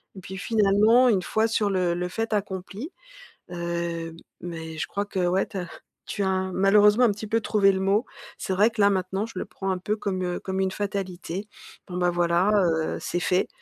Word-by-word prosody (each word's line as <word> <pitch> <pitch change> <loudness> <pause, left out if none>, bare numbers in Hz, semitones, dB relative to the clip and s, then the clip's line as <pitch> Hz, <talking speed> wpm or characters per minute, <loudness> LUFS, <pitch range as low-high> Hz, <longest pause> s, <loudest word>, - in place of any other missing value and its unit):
et - - -8
puis 190 +2 -8
finalement, 215 +4 +4
une 195 -5 +3
fois 220 +4 +1
sur 220 -2 +1
le 180 -3 +1
le 180 +1 -2
fait 225 +3 -3
accompli, 200 - -4 0.6
heu 170 -1 -3 0.3
mais 160 -2 -6
je - - -2
crois, 200 0 -2
que 195 - -4
ouais, 185 +2 +2
tu - - -7
as 180 -2 -4 0.4
tu 205 - -2
as 190 - +1
un 190 0 0
malheureusement, 210 +4 +5
un 215 - +4
petit 210 +1 -6
peu 225 +2 +1
trouvé 200 -2 +3
le 190 - -2
mot. 200 +5 +2 0.3
C'est 190 - -3
vrai 205 +4 +4
que 220 -2 -3
là 200 - +6
maintenant, 190 +1 -1
je 230 - -11
le - - -3
prends 195 - -5
un 185 - -1
peu 205 +4 -2
comme, 190 -3 -2
heu 180 0 -2
comme 190 0 -4
une 190 0 0
fatalité. 195 -1 -4 0.4
Bon, 180 - -7
bah, 180 0 +2
voilà, 175 +2 +2
heu, 165 -6 +1
c'est 175 - -2
fait. 180 0 +1
190 Hz, 215 wpm, -25 LUFS, 180-205 Hz, 0.6 s, là